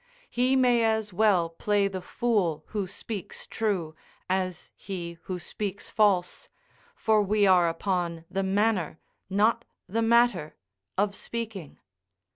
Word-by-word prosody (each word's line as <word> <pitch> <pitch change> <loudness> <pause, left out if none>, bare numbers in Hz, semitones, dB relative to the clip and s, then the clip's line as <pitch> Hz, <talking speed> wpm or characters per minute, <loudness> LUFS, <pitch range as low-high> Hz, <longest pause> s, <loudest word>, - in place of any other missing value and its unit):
He 250 +2 +2
may 245 -3 +4
as 220 -2 0
well 195 -4 +3
play 200 +4 +1
the 190 -1 -5
fool 180 - 0
who 205 -3 -2
speaks 200 +1 -7
true, 190 -8 -2 0.3
as 185 -2 -2
he 170 -3 -7
who 185 - -3
speaks 200 +3 -5
false, 195 -5 +1 0.5
for 220 -1 +3
we 205 +1 +2
are 180 -3 +5
upon 170 -1 -2
the 195 - -2
manner, 195 -4 +1 0.3
not 215 +4 +2 0.2
the 225 +4 -1
matter, 235 -8 +3 0.4
of 200 +1 +2
speaking. 220 -9 -6
200 Hz, 125 wpm, -27 LUFS, 180-220 Hz, 0.5 s, are